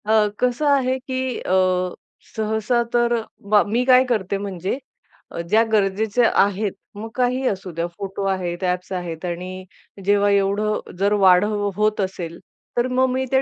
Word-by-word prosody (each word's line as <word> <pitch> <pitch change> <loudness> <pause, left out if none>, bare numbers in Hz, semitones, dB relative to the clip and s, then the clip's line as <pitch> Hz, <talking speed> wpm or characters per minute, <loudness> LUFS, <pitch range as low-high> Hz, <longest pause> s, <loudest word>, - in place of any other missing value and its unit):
अ, 215 0 +4
कसं 250 +4 0
आहे, 260 -2 +2
की 260 -1 -3
अ, - - -2 0.8
सहसा 220 +2 0
तर 240 0 +3 0.4
बा 210 -1 +6
मी 230 +4 0
काय 255 0 +6
करते 200 -4 0
म्हणजे 195 +1 -3 0.5
अ, - - -6
ज्या 220 +3 +5
गरजेच्या 215 +3 +2
आहेत, 200 +1 -1 0.2
मग 220 +2 -6
काहीही 255 +1 +1
असू 190 -3 -3
द्या 170 +1 -2
फोटो 195 0 -5
आहेत, 185 -2 -2
ॲप्स 180 0 -1
आहेत 175 -2 -5
आणि 180 +2 -5 0.4
जेव्हा 205 0 +3
एवढं 200 +2 +1 0.2
जर 200 +1 +2
वाढ 190 -3 +5 0.3
होत 210 +1 +1
असेल, 175 -3 -4 0.4
तर 240 +1 +2
मग 255 +1 +2
मी 260 +1 -1
ते 265 0 +4
210 Hz, 155 wpm, -22 LUFS, 190-240 Hz, 0.8 s, बा